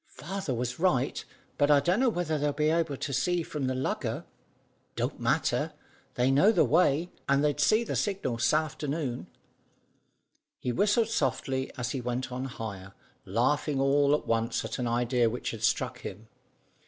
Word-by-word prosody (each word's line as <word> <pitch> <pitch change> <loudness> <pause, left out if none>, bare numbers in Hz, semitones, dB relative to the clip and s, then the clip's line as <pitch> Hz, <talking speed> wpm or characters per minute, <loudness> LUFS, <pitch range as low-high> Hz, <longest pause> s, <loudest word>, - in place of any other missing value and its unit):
"Father 190 -2 -5
was 125 +2 -3
right, 145 -8 +1 0.4
but 145 0 +4
I 145 -1 +7
dunno 190 - +2
whether 170 -7 -1
they'll 145 0 +1
be 150 +2 +1
able 165 -4 0
to 140 - -4
see 175 +5 +1
from 145 -4 -3
the 130 - -1
lugger. 130 - -2 0.7
Don't - - -2
matter. - - 0 0.4
They 125 +2 +2
know 145 +11 +5
the 215 - +4
way, 160 +4 +2 0.2
and 140 +1 +3
they'd 145 -1 +1
see 215 +10 +4
the - - -3
signal 190 - -1
s'afternoon." 150 0 -1 1.3
He 125 - -2
whistled 210 - +2
softly 135 - -1
as 125 -1 -2
he 135 - -3
went 125 +1 -3
on 130 +1 -3
higher, 100 -6 -7 0.3
laughing 135 +7 +1
all 140 +1 +4
at - - -4
once 115 0 0
at 110 - -5
an 125 - -1
idea 120 0 +2
which 120 +1 -4
struck - - 0
him. 105 +4 -8
140 Hz, 160 wpm, -29 LUFS, 125-155 Hz, 1.3 s, I